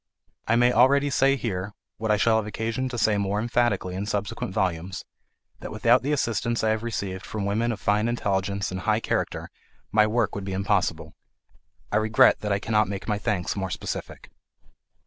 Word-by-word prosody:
I 115 - +3
may 120 +1 +4
already 140 +3 +4
say 135 +1 +3
here, 100 -6 -4 0.2
what 110 0 -3
I 105 - +4
shall 110 +2 +3
have 110 -1 -2
occasion 115 +4 -2
to 125 - -5
say 110 -2 +2
more 100 +1 0
emphatically 120 -5 0
in 100 +3 -4
subsequent 105 -2 -3
volumes, 90 -1 -2 0.5
that - - -7
without 120 +2 +3
the 140 - -2
assistance 115 -4 0
I 110 - +3
have 110 0 -1
received 100 -5 -4
from 105 -2 -4
women 110 +4 0
of 110 - -5
fine 105 +3 +1
intelligence 100 -4 -1
and 95 - -4
high 110 +2 +1
character - - -2 0.4
my 105 0 +4
work 115 0 0
would 100 - -4
be 95 0 -4
impossible. 95 -5 0 0.8
I 105 - +2
regret 110 +1 +4
that 105 - -3
I 100 - +3
cannot 105 0 +1
make 100 -1 -5
my 105 -2 0
thanks 90 -3 -1
more 95 -2 -3
specific. - - -6
105 Hz, 185 wpm, -25 LUFS, 100-115 Hz, 0.8 s, may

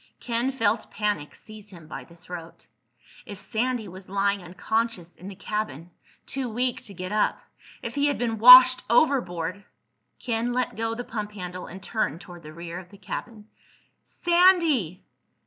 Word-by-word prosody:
Ken 240 +2 -1
felt 225 -3 0
panic 205 -8 -2
seize 215 -1 -13
him 170 -4 -13
by 155 - -8
the 170 - -18
throat. 170 -1 -10 0.6
If 205 - -8
Sandy 225 +3 -2
was 185 +1 -11
lying 200 0 0
unconscious 185 +1 -3
in 185 - -11
the 200 - -8
cabin, 200 -5 -4 0.3
too 265 -2 -4
weak 245 +2 -1
to 200 - -10
get 185 +2 -6
up—if 210 0 -3
he 285 0 +1
had 285 - 0
been 225 -2 -2
washed 255 +2 +10
overboard—! 200 - +1 0.5
Ken 235 0 -2
let 250 0 -1
go 225 0 -2
the 245 - -5
pump 210 -3 -5
handle 180 -2 -7
and 190 +2 -10
turned 185 -8 -2
toward 175 -3 -12
the 155 - -11
rear 170 +2 -7
of 180 -1 -13
the 200 - -15
cabin. 210 +2 -7 0.5
"Sandy! 340 - +2
210 Hz, 160 wpm, -25 LUFS, 180-240 Hz, 0.6 s, washed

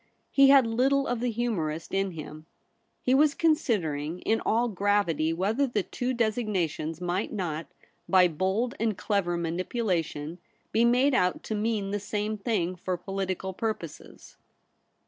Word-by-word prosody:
He 275 -1 +6
had 275 -2 +7
little 265 +5 +2
of 245 -1 -1
the 245 +1 0
humourist 195 -10 -2
in 195 -1 0
him. 155 0 -9 0.6
He 255 - +2
was 295 +2 +4
considering 180 - 0
in 225 - +1
all 235 +2 +2
gravity 200 -6 +1
whether 210 +11 +1
the 215 -5 -1
two 250 +6 -3
designations 200 -9 -1
might 180 +3 -2
not, 165 -6 -3 0.4
by 185 -2 +6
bold 190 +9 -1
and 220 -3 0
clever 190 -5 0
manipulation, 170 -2 -2 0.3
be 230 +2 +3
made 250 +4 +4
out 180 -8 +1
to - - -4
mean 210 -2 -1
the 205 - -1
same 210 +1 -2
thing 200 -5 -1
for 180 0 -3
political 190 0 -3
purposes. 200 -7 -6
200 Hz, 145 wpm, -27 LUFS, 175-235 Hz, 0.6 s, had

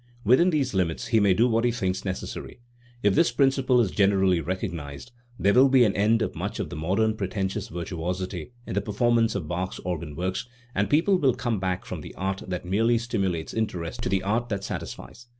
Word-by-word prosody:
Within 130 - +5
these 140 -7 0
limits 90 -4 -1
he 115 -3 +4
may 100 -3 +4
do 115 +5 +4
what 115 -1 +1
he 120 - +3
thinks 95 -6 -2
necessary. 95 +4 -5 0.4
If 100 -1 +4
this 120 - +3
principle 135 0 +3
is 110 -6 +2
generally 95 -3 +3
recognised, 85 - -5 0.3
there 100 +2 +3
will 135 +2 +6
be 130 -2 +6
an 105 -4 +2
end 110 +3 +3
of - - -3
much - - -4
of - - -3
the - - -5
modern 100 +8 +1
pretentious 95 +1 -3
virtuosity 90 0 -4
in - - -5
the 100 - +1
performance 115 +2 +1
of 90 -6 -3
Bach's 90 +3 -3
organ 85 -4 -4
works, 95 +7 -3 0.3
and 100 +1 0
people 180 - +3
will 135 -6 +3
come 115 -4 -1
back 95 -1 -2
from - - -6
the - - -10
art 95 +1 -2
that 90 -1 -4
merely 115 +6 +2
stimulates 100 -8 -2
interest 90 -7 -3
to - - -2
the 95 0 +1
art 115 +5 0
that 100 -2 -3
satisfies. 120 +4 -7
100 Hz, 205 wpm, -26 LUFS, 90-115 Hz, 0.4 s, will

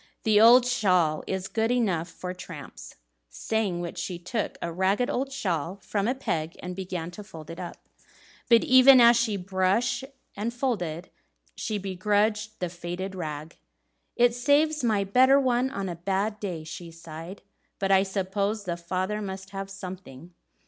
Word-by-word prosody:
The 215 -1 +4
old 240 +2 +8
shawl 180 -10 +2
is 190 0 -2
good 225 +2 0
enough 195 -9 0
for 180 0 -6
tramps." 180 - -10 0.3
Saying 180 - -2
which 170 -1 -5
she 180 - -4
took 180 +6 -3
a 170 - -3
ragged 195 - +1
old 270 +1 -2
shawl 180 - -2
from 200 0 -1
a 250 - +1
peg, 160 -10 -3
and 180 0 -5
began 180 -3 -5
to 205 +4 -9
fold 160 -6 -10
it 165 - -9
up. 175 -2 -8 0.6
But 230 -1 +6
even 260 0 +8
as 235 0 +8
she 230 -3 +1
brushed 195 +7 0 0.3
and 215 +4 -2
folded, 190 - -3 0.4
she 215 - -3
begrudged 210 +3 0
the 180 - -2
faded 175 +2 -5
rag. 155 -3 -6 0.6
"It 240 0 +4
saves 290 +4 +2
my 215 -4 +2
better 260 +7 +5
one 255 -1 +1
on 195 -6 -4
a 175 - -4
bad 195 +4 -1
day," 180 -6 -4
she 165 +2 -8
sighed; 165 +3 -10 0.3
"but 195 0 0
I 190 0 +6
suppose 200 +2 -1
the 175 -3 -3
father 185 +4 -2
must 190 -1 -6
have 195 0 -5
something." 180 -5 -9
195 Hz, 165 wpm, -27 LUFS, 175-225 Hz, 0.6 s, old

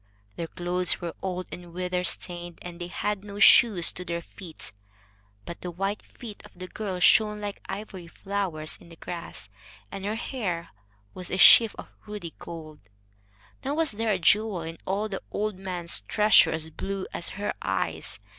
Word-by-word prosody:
Their 165 - -3
clothes 180 +1 0
were 170 -1 -4
old 185 -1 -3
and 175 -1 -9
weather 180 0 -1
stained, 175 -1 -2
and 175 0 -8
they 175 - -3
had 205 +2 -2
no 205 -1 -8
shoes 200 -2 +7
to 180 - -6
their 170 -1 -3
feet; 170 -2 -10 0.7
but 170 - -7
the 180 - -4
white 195 +4 -2
feet 225 -5 -11
of 210 -3 -16
the 185 0 -6
girl 190 -2 -4
shone 210 +3 +5
like 205 -1 -5
ivory 195 -4 -6
flowers 180 -4 -3
in - - -15
the 165 - -12
grass, 165 - -7 0.4
and 195 - -6
her 210 +2 -1
hair 200 -9 -3 0.4
was 180 -1 -5
a 185 - -1
sheaf 225 +3 +9
of - - -9 0.2
ruddy 205 -6 -6
gold. 155 -3 -8 0.8
Nor 280 +2 -1
was 320 -2 +2
there 220 +1 0
a 195 - +2
jewel 195 +1 +3
in 165 +1 -7
all 200 +3 0
the 195 -3 -5
old 210 -2 -2
man's 175 - -2
treasure 210 -1 +6
as 160 0 -2
blue 195 +3 -4
as 170 - -2
her 205 +1 -1
eyes. - - -2
185 Hz, 175 wpm, -27 LUFS, 170-205 Hz, 0.8 s, sheaf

